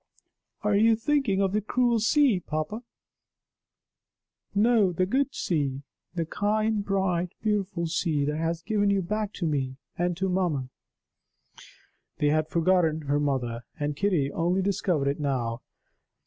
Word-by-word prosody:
"Are 210 0 +2
you 225 +2 +5
thinking 225 -5 +1
of 190 0 0
the 210 - +1
cruel 240 +2 +1
sea, 240 -1 +3
papa? 155 +7 -4 1.7
No! 215 -2 +4
the 185 +2 +1
good 270 +7 +1
sea, 140 -5 -1 0.3
the 165 -2 -1
kind, 215 +4 0
bright, 185 -3 0
beautiful 200 -5 0
sea 160 -3 0
that 150 +1 -1
has 165 +1 -2
given 205 -2 +1
you 200 -1 +2
back 210 +3 -2
to 175 - -3
me, 135 -4 -1 0.2
and 175 -1 0
to 190 +1 0
mamma 175 -8 0 0.7
!" - - -23
They 145 - +2
had 155 +1 +1
forgotten 165 -2 +2
her 145 0 0
mother! 125 -5 -1 0.2
and 145 0 -1
Kitty 165 -6 +1
only 180 +3 0
discovered 180 -7 0
it 140 +2 -1
now. 125 -5 -1
180 Hz, 145 wpm, -27 LUFS, 150-205 Hz, 1.7 s, you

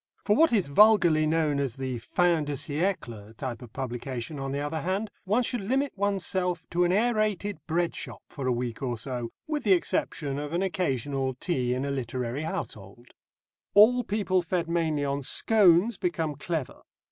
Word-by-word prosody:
For 210 - +4
what 325 +6 +5
is 205 -6 +3
vulgarly 170 -2 +5
known 155 -2 +1
as 135 -4 -1
the 130 -2 -4
fin 165 +6 +1
de 145 - -3
siècle 135 - -2
type 120 -2 -5
of 120 -3 -11
publication, 130 +2 -5
on 135 0 -3
the 140 - -2
other 145 +2 -3
hand, 195 +5 -2
one 215 +6 +2
should 245 -1 0
limit 265 +7 -1
oneself 190 -3 -1
to 175 +1 +2
an 175 - +2
aërated 210 -3 0
bread 170 +1 0
shop - - -8
for 135 -3 -5
a - - +3
week 120 -1 -3
or 125 -3 -2
so, 120 0 -4 0.2
with 300 -3 -3
the 200 - +5
exception 150 -5 -1
of 150 +1 -5
an 175 +3 +1
occasional 135 -7 -1
tea 125 -4 -1
in 130 +2 -2
a 140 - -2
literary 130 +2 -3
household. 110 -5 -6 0.7
All 245 +5 +7
people 200 -4 0
fed 175 0 -2
mainly 160 -4 0
on 140 0 -1
scones 200 - +4
become 165 - -1
clever. 145 - -4
160 Hz, 175 wpm, -27 LUFS, 130-195 Hz, 0.7 s, All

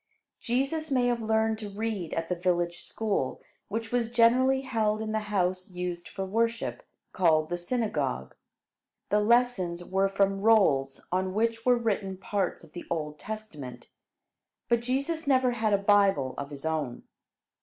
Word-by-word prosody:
Jesus 275 +6 -1
may 255 -3 +2
have 240 -1 +1
learned 220 0 +1
to 210 -2 -6
read 205 -4 -3
at 165 0 -2
the 180 - 0
village 175 -1 0
school, 205 -12 -2 0.3
which 225 +1 -4
was 240 -2 +1
generally 250 +3 +4
held 220 -5 0
in 220 0 -3
the 220 - +1
house 185 -2 0
used 180 -1 -5
for 195 - -4
worship, 230 +4 -1 0.3
called 160 -4 +3
the 175 - -1
"synagogue." 165 - -2 0.8
The 210 - +3
lessons 210 -6 +2
were 195 +2 +1
from 195 0 +1
rolls 155 -12 +3
on 185 +1 0
which 230 +2 0
were 250 -1 +6
written 200 -5 -1
parts 195 -2 -2
of 165 - -16
the 175 - -7
Old 150 -2 -3
Testament; 150 - -8 0.8
but 235 -1 +3
Jesus 280 +7 -2
never 260 -2 +4
had 220 -2 0
a 200 - +5
Bible 200 -9 +3
of 140 0 -5
his 145 0 -9
own. 155 -6 -2
205 Hz, 155 wpm, -28 LUFS, 175-230 Hz, 0.8 s, were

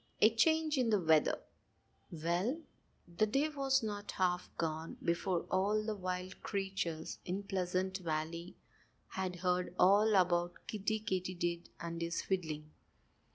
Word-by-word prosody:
XI - - +7
A - - +9
CHANGE 315 +4 +3
IN 245 -3 +2
THE 210 -2 +4
WEATHER 160 -3 +4 0.7
Well, 175 - -1 0.5
the 175 +5 +1
day 275 +8 +2
was 270 -3 +1
not 205 -1 -4
half 180 -2 0
gone 160 0 -2
before 175 +1 +1
all 205 +3 +2
the 220 - -1
wild 185 -1 -4
creatures 190 -5 -3
in 190 +3 -3
Pleasant 185 0 -1
Valley 165 +1 -3 0.5
had 185 -1 -3
heard 180 0 0
all 205 +3 +6
about 175 -2 +2
Kiddie 215 +1 -1
Katydid 180 -4 -2
and 170 0 -4
his 170 0 -1
fiddling. 155 -5 -2
185 Hz, 135 wpm, -35 LUFS, 170-210 Hz, 0.7 s, A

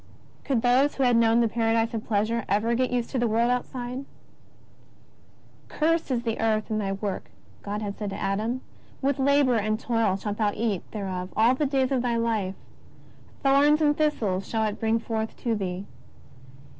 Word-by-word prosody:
Could 255 -5 0
those 255 +4 +3
who 270 - 0
had 245 -2 +4
known 230 0 +4
the 230 - +3
paradise 225 0 +1
of 220 -1 -3
pleasure 220 +2 0
ever 210 +4 +2
get 255 +2 +1
used 245 -1 -2
to 260 - -1
the 240 - +2
world 230 +2 +2
outside! 250 +1 -3 0.9
" - - -30
Cursed 325 +1 +1
is 245 -3 0
the 225 -2 -2
earth 220 -1 0
in 215 - 0
thy 195 -2 -1
work," 195 -1 -4 0.3
God 210 +1 -4
had 200 -1 -5
said 210 -2 -3
to 195 - -6
Adam; 220 +6 -1 0.4
^' - - -28
with 275 0 +1
labour 275 -2 +3
and 215 0 0
toil 225 -5 +1
shalt 205 +1 -4
thou 210 -2 +1
eat 215 -5 -1
thereof 185 -3 -4
all 230 +3 +5
the 285 +3 0
days 265 -1 +1
of 260 -2 +2
thy 240 -1 0
life. 220 -5 -1 0.9
Thorns 285 +2 +5
and 295 -1 +3
thistles 215 -12 0
shall 225 -1 0
it 210 -1 -3
bring 225 0 +2
forth 225 -1 -3
to 235 - +1
thee. 190 -2 -3
230 Hz, 190 wpm, -26 LUFS, 210-255 Hz, 0.9 s, all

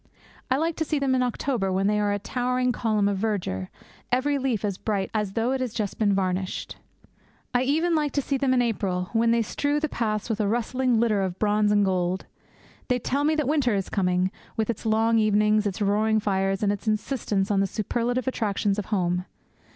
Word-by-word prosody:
I 260 - +2
like 325 +2 0
to 320 - +1
see 310 -1 -1
them 275 -2 +1
in 255 - +2
October, 245 -4 -1
when 190 +1 +1
they 210 +1 +2
are 205 -1 +1
a 205 - +1
towering 250 +3 0
column 215 -4 +1
of 200 -1 -1
verdure, 180 - -2 0.4
every 280 +3 +1
leaf 250 -6 -1
as 200 -2 -3
bright 200 -3 -2
as 210 -3 -1
though 230 +4 0
it 265 -1 -1
has 245 -3 -3
just 210 -4 -3
been 205 -3 +3
varnished. 185 -1 -2 0.8
I 245 - +3
even 315 +6 +1
like 300 -3 +1
to 285 - +1
see 275 - -1
them 270 -1 +1
in 250 -1 +3
April, 190 -6 -2
when 230 0 +3
they 230 0 +3
strew 290 +6 -1
the 310 - 0
paths 215 -6 -2
with 225 -2 -2
a 205 - +1
rustling 240 +2 +1
litter 220 -3 +2
of 185 -1 -2
bronze 210 0 +2
and 205 -1 +4
gold. 185 -1 0 0.6
They 250 - +2
tell 275 +4 -1
me 310 +1 +2
that 305 -4 0
winter 275 -7 +2
is 195 -2 -2
coming, 180 -1 +1 0.3
with 220 +1 +1
its 225 - -6
long 225 +1 +3
evenings, 210 0 +3
its 200 +1 -2
roaring 215 +2 +2
fires, 195 -1 0
and 200 - +3
its 205 +2 -5
insistence 215 -2 0
on 200 - +2
the 195 - +2
superlative 240 +5 -2
attractions 205 -4 0
of 205 - -4
home. 180 -3 0
215 Hz, 215 wpm, -25 LUFS, 200-250 Hz, 0.8 s, and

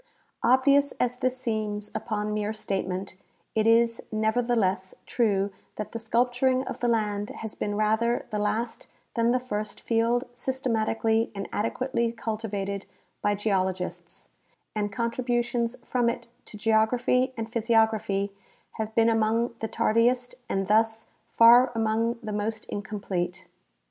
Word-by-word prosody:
Obvious 280 +3 +4
as 250 0 -1
this 255 0 0
seems 215 -4 -3
upon 210 -2 -2
mere 210 0 -1
statement, 190 -3 -3 0.4
it 220 0 +2
is 230 0 +4
nevertheless, 220 -4 +1
true 200 -4 +1 0.2
that 210 - -5
the 230 - -4
sculpturing 245 +3 +2
of - - -5
the 245 - 0
land 210 -3 0
has 220 -1 -7
been 205 0 -3
rather 220 +3 +1
the 210 - -1
last 225 +3 -2 0.3
than 230 0 +2
the 250 +1 +3
first 215 -4 -4
field 230 +2 +1
systematically 225 -3 0
and 195 -1 -4
adequately 235 +2 0
cultivated 210 -4 -4 0.3
by 205 0 +2
geologists, 185 -4 -2 0.5
and 205 -1 -1
contributions 240 +1 -1
from 245 -2 +1
it 235 0 -4 0.2
to 210 - -9
geography 240 +4 +2
and 225 0 -4
physi 230 0 0
ograph}^ 220 -3 +2 0.5
have 220 0 -4
been 230 0 +5
among 225 +1 +2
the 220 - -2
tardiest 230 +3 +2 0.2
and 195 0 0
thus 225 +2 +2 0.2
far 240 +2 +7
among 225 +1 +1
the 215 -1 -4
most 215 +1 -2
incomplete. 195 -3 -3
225 Hz, 135 wpm, -27 LUFS, 210-235 Hz, 0.5 s, far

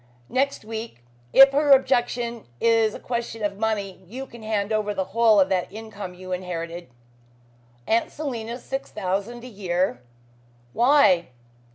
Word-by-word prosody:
"Next 270 -3 0
week. 220 - -7 0.3
If 270 0 +9
her 290 +1 +1
objection 240 -3 +1
is 225 -2 +3
a - - -7
question 235 -2 -4
of 200 -1 -2
money, 205 -4 -2
you 255 +7 -6
can 235 -3 -13
hand 215 -1 -1
over 210 -1 0
the 190 - 0
whole 225 -2 +5
of 190 - +5
that 185 -2 -1
income 205 -3 -8
you 185 +1 -10
have 180 0 -2
inherited." 170 -2 -6 1.0
"Aunt 225 - +1
Selina's 240 -5 -5
six 270 +1 -4
thousand 205 +4 -3
a - - -8
year! 185 - -1 0.7
Why?" 240 - +4
220 Hz, 150 wpm, -24 LUFS, 190-240 Hz, 1.0 s, If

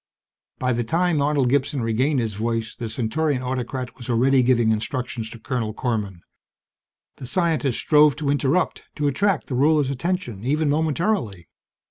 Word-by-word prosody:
By 125 0 0
the 120 +1 -1
time 165 +4 +1
Arnold 140 -2 +2
Gibson 140 -1 0
regained 130 +6 +1
his 115 -3 -2
voice, 115 +2 -2
the 115 -2 -5
Centaurian 130 +4 -1
autocrat 125 0 -4
was 125 -1 -9
already 130 +3 +3
giving 120 -3 +3
instructions 115 0 -3
to 115 - -10
Colonel 110 0 -3
Korman. 105 -8 -3 1.0
The 130 - -8
scientist 160 -6 0
strove 150 -2 +4
to 145 -2 -1
interrupt, 145 +5 +1
to 150 - -2
attract 190 +6 +1
the - - -6
ruler's 145 +1 +3
attention 135 - -3
even 145 +3 +1
momentarily. 155 - -1
130 Hz, 150 wpm, -23 LUFS, 115-150 Hz, 1.0 s, strove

